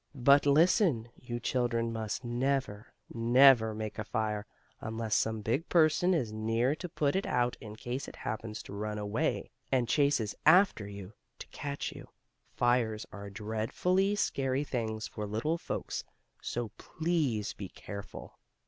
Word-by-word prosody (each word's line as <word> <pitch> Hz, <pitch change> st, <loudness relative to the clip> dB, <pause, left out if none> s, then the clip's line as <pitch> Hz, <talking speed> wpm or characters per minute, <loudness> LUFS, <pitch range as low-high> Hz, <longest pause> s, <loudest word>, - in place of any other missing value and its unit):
But 140 Hz, +2 st, +5 dB
listen, 150 Hz, -, +4 dB
you 120 Hz, -1 st, -6 dB
children 120 Hz, -2 st, 0 dB
must 110 Hz, +2 st, -3 dB
never, 120 Hz, -3 st, -1 dB, 0.3 s
never 115 Hz, -1 st, +6 dB
make 110 Hz, 0 st, -5 dB
a -, -, -1 dB
fire, 105 Hz, 0 st, -2 dB, 0.3 s
unless 110 Hz, 0 st, -3 dB
some 110 Hz, 0 st, +1 dB
big 120 Hz, +10 st, -1 dB
person 170 Hz, +2 st, +4 dB
is 120 Hz, -9 st, -1 dB
near 115 Hz, +4 st, +1 dB
to 180 Hz, -, -6 dB
put 145 Hz, -1 st, 0 dB
it 195 Hz, -, 0 dB
out 120 Hz, 0 st, +1 dB
in 105 Hz, -2 st, -8 dB
case 125 Hz, +5 st, -4 dB
it -, -, -9 dB
happens 110 Hz, 0 st, -5 dB
to -, -, -10 dB
run 105 Hz, +1 st, -3 dB
away, 105 Hz, +1 st, -1 dB, 0.2 s
and 125 Hz, -3 st, +2 dB
chases 140 Hz, -7 st, +2 dB
after 160 Hz, -, +5 dB
you, 100 Hz, 0 st, -9 dB, 0.2 s
to -, -, -8 dB
catch 145 Hz, 0 st, -4 dB
you. -, -, -11 dB, 0.5 s
Fires 120 Hz, -3 st, +1 dB
are 100 Hz, 0 st, -8 dB
dreadfully 115 Hz, -, 0 dB
scary 135 Hz, -7 st, 0 dB
things 110 Hz, -5 st, -3 dB
for 105 Hz, -1 st, -5 dB
little 135 Hz, +11 st, -1 dB
folks, -, -, -4 dB, 0.4 s
so 120 Hz, -2 st, -3 dB
please 155 Hz, -11 st, -1 dB
be 100 Hz, -3 st, -7 dB
careful. 100 Hz, +1 st, -9 dB
120 Hz, 150 wpm, -31 LUFS, 110-140 Hz, 0.5 s, never